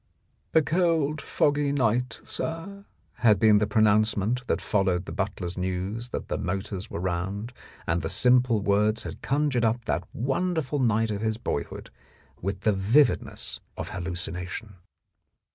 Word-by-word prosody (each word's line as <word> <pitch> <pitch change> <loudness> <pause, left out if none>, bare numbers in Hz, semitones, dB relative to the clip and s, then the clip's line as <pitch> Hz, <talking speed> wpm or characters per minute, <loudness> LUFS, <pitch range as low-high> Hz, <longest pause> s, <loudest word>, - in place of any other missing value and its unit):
"A 160 - +6
cold, 160 -3 +1
foggy 145 -1 +1
night, 125 -2 0
sir," 195 +5 -5 0.3
had 110 -4 +5
been 105 +1 +5
the 105 - +1
pro 110 +1 +3
nouncement 110 +3 +2
that - - +1
followed 95 -3 +1
the - - -7
butler's 95 -3 -3
news 95 +6 -3
that - - -5
the - - -2
motors 95 +1 -3
were - - -4
round, 95 +6 -3 0.3
and 85 +1 0
the 80 - -3
simple 125 -2 +4
words 105 +2 +2
had - - -7
con 145 +2 +1
jured 120 -2 +1
up 115 +1 +1
that - - -1
wonderful 145 +3 -1
night 115 -3 +2
of 100 0 -3
his 110 -1 0
boyhood 70 -10 -4 0.5
with 95 +1 -3
the 105 +1 +3
vividness 115 +8 +1 0.2
of - - -4
hallucination. 90 +3 -4
110 Hz, 150 wpm, -27 LUFS, 95-130 Hz, 0.5 s, A